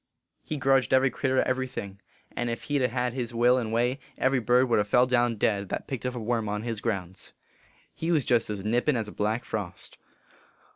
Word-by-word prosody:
He 155 - -5
grudged 135 -2 +3
every 130 0 +3
critter 130 +1 +1
every 130 0 -1
thing; 100 -5 -7 0.3
and 120 0 -1
if 115 - -4
he 145 -1 0
d 130 - +2
ha - - -8
hed 125 -1 -1
his 120 -2 -4
will 120 +2 +4
and 110 -3 -3
way, 120 +4 +1 0.2
every 130 0 +2
bird 125 +2 +3
would 115 - +3
ha - - +3
fell 125 +5 +4
down 120 -2 +2
dead 100 -2 0
that - - -4
picked 130 -2 -3
up 125 - -4
a - - -3
worm 115 -1 -1
on 105 +1 -3
his 115 -3 -3
grounds. 95 -5 -4 0.6
He 165 +2 -2
was 155 -6 +2
jest 120 -3 +2
as 100 -2 -4
nippin 120 +6 +2
as 110 -3 -2
a - - -8
black 110 +3 -1
frost. 100 -5 -6
120 Hz, 225 wpm, -27 LUFS, 110-130 Hz, 0.6 s, will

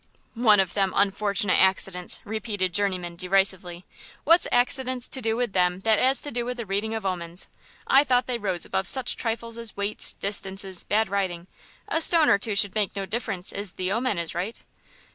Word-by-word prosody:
"One 225 -3 +4
of 190 -2 0
them 195 -2 0
unfortunate 200 0 +1
accidents," 190 -1 0
repeated 205 -4 -3
Journeyman, 180 -4 -1
derisively; 185 -1 +1 0.4
"what's 335 +3 +4
accidents 255 0 +1
to 265 - +1
do 225 -1 -1
with 240 -4 -2
them 180 0 +1
that 220 0 +2
'as 265 +1 +3
to 290 - -6
do 240 -1 -2
with 250 +1 -5
the 235 - -5
reading 205 +3 -2
of 220 -3 -5
omens? 175 -1 -3 0.4
I 275 +2 +5
thought 250 -3 +1
they 245 -2 -3
rose 190 -5 -1
above 190 - -2
such 260 -2 +3
trifles 230 0 -4
as 230 -3 -6
weights, 200 +1 -2
distances, 195 -2 0
bad 220 +2 +1
riding.... 185 -4 -3 0.4
A 320 - 0
stone 325 -1 +5
or 200 - +4
two 210 0 -2
should 200 -1 +2
make 210 -3 -1
no 195 -1 -3
difference 195 -3 -3
if 200 -2 -5
the 185 0 -3
omen 230 -1 -1
is 170 -1 -3
right." 185 +7 -4
205 Hz, 190 wpm, -25 LUFS, 190-235 Hz, 0.4 s, I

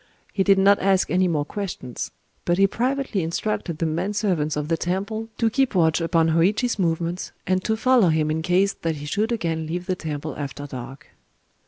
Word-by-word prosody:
He 195 - 0
did 195 0 +5
not 200 +1 +5
ask 190 -1 +2
any 185 +1 +3
more 150 -4 0
questions; 175 - -5 0.3
but 175 - +1
he 195 - +5
privately 250 0 -1
instructed 170 0 -2
the 165 - -1
men 170 +6 -1
servants 180 -8 0
of 150 0 -2
the 165 - +1
temple 200 +7 -3
to 230 - +2
keep 265 +1 +1
watch 160 -1 +3
upon 165 -1 +2
Hōïchi's 200 +9 +2
movements, 170 0 -1
and 185 0 +1
to 220 0 0
follow 240 -5 +4
him 155 -1 +1
in 160 +1 -1
case 185 +4 +2
that 165 -1 -3
he 145 0 -7
should 210 +9 -1
again 165 -8 -1
leave 175 +2 -3
the 185 - -1
temple 155 -3 -5
after 145 0 -5
dark. 135 0 -9
175 Hz, 195 wpm, -23 LUFS, 160-200 Hz, 0.3 s, did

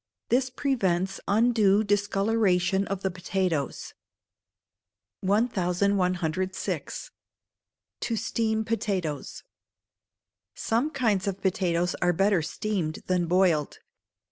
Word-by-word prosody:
This 255 +2 +2
prevents 195 -9 0
undue 215 -1 +4
discolouration 200 -2 +1
of 195 -1 -4
the 190 - 0
potatoes. 180 -4 -2 1.3
1106. 185 -3 0 0.9
To 230 - -2
Steam 220 0 -1
Potatoes. 190 - -3 1.1
Some 235 +7 0
kinds 225 -9 0
of 195 -1 -2
potatoes 180 -2 +1
are 175 0 +3
better 195 0 +3
steamed 165 -1 -3
than 180 -2 0
boiled. 175 -4 +2
195 Hz, 85 wpm, -27 LUFS, 180-220 Hz, 1.3 s, undue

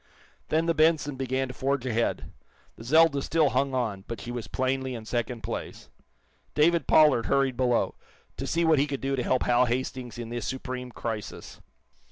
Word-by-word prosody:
Then 160 +1 +2
the 165 - +2
"Benson" 155 -2 +2
began 130 0 -1
to - - -6
forge 135 -1 -1
ahead. 115 -2 -1 0.4
The - - -11
"Zelda" 155 +2 +4
still 155 0 +2
hung 135 -1 0
on, 110 -6 -2
but 115 -3 -5
she 120 +4 -6
was 120 -2 -5
plainly 130 0 -1
in 110 -2 -8
second 120 0 -3
place. - - -6 0.7
David 160 0 +3
Pollard 150 -7 +5
hurried 135 -2 +2
below, 125 -1 +1 0.4
to - - -4
see 170 0 +1
what 160 -3 +4
he 145 - +2
could 140 -2 -4
do 135 0 0
to 130 - -1
help 130 +1 +1
Hal 125 +1 +3
Hastings 125 0 -3
in 120 -1 -6
this 120 0 -4
supreme 130 -1 -5
crisis. 110 -3 -6
130 Hz, 185 wpm, -27 LUFS, 120-140 Hz, 0.7 s, Pollard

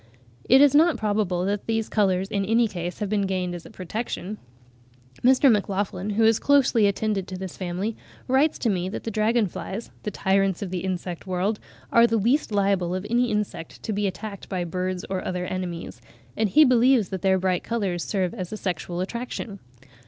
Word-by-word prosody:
It 260 +3 +7
is 290 -1 +6
not 320 +2 +5
probable 205 -4 0
that 200 +1 -2
their 225 0 +1
colours 195 -3 +1
in 200 0 -1
any 225 +3 +3
case 175 -3 -5
have 210 - -2
been 200 -1 0
gained 185 -2 -2
as 175 -1 -8
a - - -13
protection. 210 +1 -5 0.8
Mr. 260 +1 +6
MacLachlan, 200 -2 -1
who 225 - +4
has 220 0 +4
closely 260 -7 +4
attended 200 -1 -1
to 185 - -6
this 190 -1 -6
family, 185 +4 -3 0.3
writes 270 +4 +3
to 235 - 0
me 185 -1 -1
that - - -6
dragon 220 +2 +2
flies—the 200 +3 -6
tyrants 195 -1 +1
of 185 - -6
the 185 - -2
insect 180 -1 -4
world—are 210 +5 +1
the 230 0 +1
least 240 +6 +1
liable 195 -3 +1
of 185 +1 -4
any 240 +1 +2
insect 210 -6 -4
to 220 - -2
be 205 0 0
attacked 200 +2 -7
by 185 -2 -2
birds 185 +1 -3
or 190 -1 -3
other 180 -1 -3
enemies, 180 -2 -5 0.3
and 220 -1 +1
he 305 +10 +6
believes 250 -4 +4
that 190 -2 -4
their 190 -1 +3
bright 185 -1 0
colours 195 -7 -2
serve 185 -4 -1
as 185 -6 -6
a 215 - -4
sexual 180 -2 -3
attraction. 230 0 -5
200 Hz, 185 wpm, -25 LUFS, 185-225 Hz, 0.8 s, It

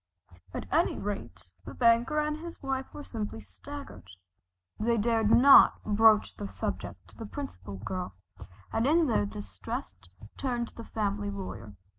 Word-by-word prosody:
At - - -5
any - - +2
rate 90 +1 -6
the - - -9
banker 235 +5 +3
and 300 0 -1
his 335 +1 -9
wife 265 -1 -3
were 295 - -8
simply 215 - -5
staggered. 95 -2 -10 0.7
They 230 +2 +2
dared 225 0 +2
not 270 +4 +8
broach 215 0 +4
the 100 - -5
subject 95 -1 -5
to - - -19
the - - -7
Principal 95 +2 -7
Girl, 180 - -5 0.6
and 225 +3 +2
in 325 +3 +4
their 105 - +1
distress 100 -2 -6 0.4
turned 240 -3 -2
to - - -21
the 230 - -8
family 205 -1 -2
lawyer. 190 - -7
215 Hz, 150 wpm, -29 LUFS, -, 0.7 s, not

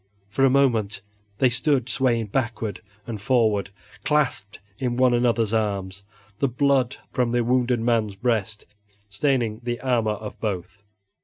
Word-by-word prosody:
For 135 +4 +1
a 135 - +6
moment 115 -7 +2 0.4
they 130 0 +3
stood 130 -1 +1
swaying 120 -3 +1
backward 115 -6 -2 0.2
and 110 -4 -6
forward, 110 -5 +2 0.3
clasped 135 -9 0 0.2
in 125 -2 -1
one 130 -1 +4
another's 115 -2 +2
arms, 100 -3 -2 0.4
the 140 - +2
blood 135 0 +1
from 125 -3 0
the 120 -1 +2
wounded 125 0 +2
man's 115 -3 +1
breast 110 -1 -1 0.5
staining 115 -1 0
the 120 0 -3
armor 120 -5 +1
of 105 0 -8
both. 100 -1 -4
120 Hz, 140 wpm, -24 LUFS, 105-130 Hz, 0.5 s, a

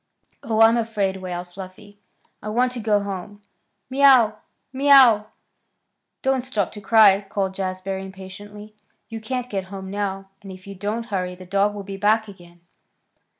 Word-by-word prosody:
"Oh, 220 -1 0
I'm 225 +1 +6
afraid!" 210 -4 -1
wailed 180 -1 -6
Fluffy. 195 +3 -12 0.4
"I 215 - -6
want 245 +3 +1
to 250 - -5
go 210 -2 +1
home. 200 +1 -7 0.4
Mew! 260 -5 +5 0.4
Mew!" 260 -6 +6 1.0
"Don't 265 -1 +1
stop 245 -6 -2
to 210 - -10
cry," 205 -1 +5
called 195 -3 -2
Jazbury 190 0 -4
impatiently. 205 +2 -11 0.4
"You 225 -1 -7
can't 250 +2 -4
get 195 -5 -4
home 190 0 -8
now, 195 -1 -4
and 195 - -10
if 185 0 -12
you 200 - -8
don't 210 +4 -4
hurry 180 -1 -2
the 185 0 -12
dog 200 +2 +1
will 200 - -6
be 195 0 -7
back 215 +2 +2
again." 175 -3 -15
205 Hz, 155 wpm, -22 LUFS, 190-225 Hz, 1.0 s, I'm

